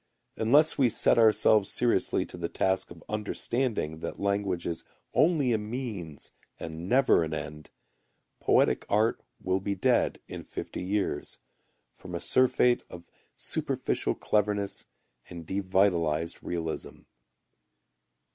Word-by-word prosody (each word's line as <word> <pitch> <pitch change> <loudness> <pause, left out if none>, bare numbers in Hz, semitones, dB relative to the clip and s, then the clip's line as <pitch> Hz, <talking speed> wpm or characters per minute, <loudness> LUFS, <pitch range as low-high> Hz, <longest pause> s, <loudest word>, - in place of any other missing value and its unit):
Unless 145 +9 +4
we 130 -3 +5
set 115 - +3
ourselves 110 -2 +4
seriously 120 -1 +1
to - - -10
the - - -4
task 95 0 0
of 85 -1 -13
understanding 105 - -2
that - - -6
language 100 -3 -1
is 85 -1 -4 0.3
only 150 -7 +3
a 110 - +1
means 105 - -6 0.3
and 80 +2 -6
never 130 -8 +4
an 80 -1 -3
end, 75 0 -7 0.7
poetic - - +3
art 110 +3 +2 0.2
will 95 +1 0
be 100 +1 -2
dead 95 - +2
in - - -7
fifty - - -6
years, 100 +2 -2 0.6
from - - -8
a - - -2
surfeit 125 -1 +3
of 85 -1 -10 0.3
superficial - - -1
cleverness 105 -1 -1 0.4
and 85 -2 -9
devitalized 90 -4 +1
realism. 80 -2 -5
100 Hz, 120 wpm, -28 LUFS, 85-115 Hz, 0.7 s, we